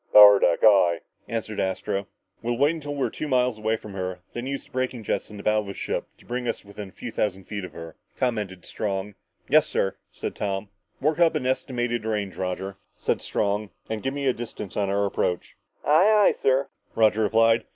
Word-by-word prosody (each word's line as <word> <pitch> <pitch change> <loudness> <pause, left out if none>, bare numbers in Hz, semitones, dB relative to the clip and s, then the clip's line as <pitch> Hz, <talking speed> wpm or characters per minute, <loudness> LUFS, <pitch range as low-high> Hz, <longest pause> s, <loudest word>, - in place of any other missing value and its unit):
"Power 105 -1 +10
deck, 85 - +2
aye," 90 -6 +6 0.3
answered 110 -2 -3
Astro. 95 +1 -1 0.3
"We'll 120 +1 -1
wait 145 +5 +4
until 145 -3 -5
we're 140 - 0
about - - -4
two 155 - -4
miles 125 -4 +2
away 110 +1 +1
from 105 -2 -10
her 95 -1 -2
and 90 - -18
then 120 +2 -4
use 140 0 -4
our - - -23
braking 130 -2 -2
jets - - -2
in 105 - -9
the 100 - -8
bow 105 0 +3
of 105 - -4
the 100 - -6
ship - - -3
to - - -21
bring 125 0 -3
us 115 - -3
within 100 -1 -8
a - - -18
few 115 +3 -7
thousand 95 -3 -1
feet 100 +1 -5
of 90 - -8
her," 85 -1 -9 0.2
commented 105 -7 -2
Strong. 100 -1 -3 0.3
"Yes, - - +5
sir," 95 - 0
said - - -5
Tom. 100 0 -2 0.3
"Work 155 +3 +1
up 165 -2 +5
an 140 -4 -1
estimated 120 -3 -1
range, 105 -3 -2
Roger," 95 +1 -3 0.2
said - - 0
Strong, 105 0 0 0.2
"and 110 -1 -2
give 135 +4 -2
me 140 -1 -2
a 130 - +4
distance 115 -4 -7
on 100 -2 0
our 100 +1 +2
approach." 90 -2 -1 0.3
"Aye, 200 +7 +6
aye, - - -7
sir," 135 +1 +3 0.3
Roger 110 -1 +4
replied. 115 +1 +4
110 Hz, 215 wpm, -25 LUFS, 100-125 Hz, 0.3 s, Power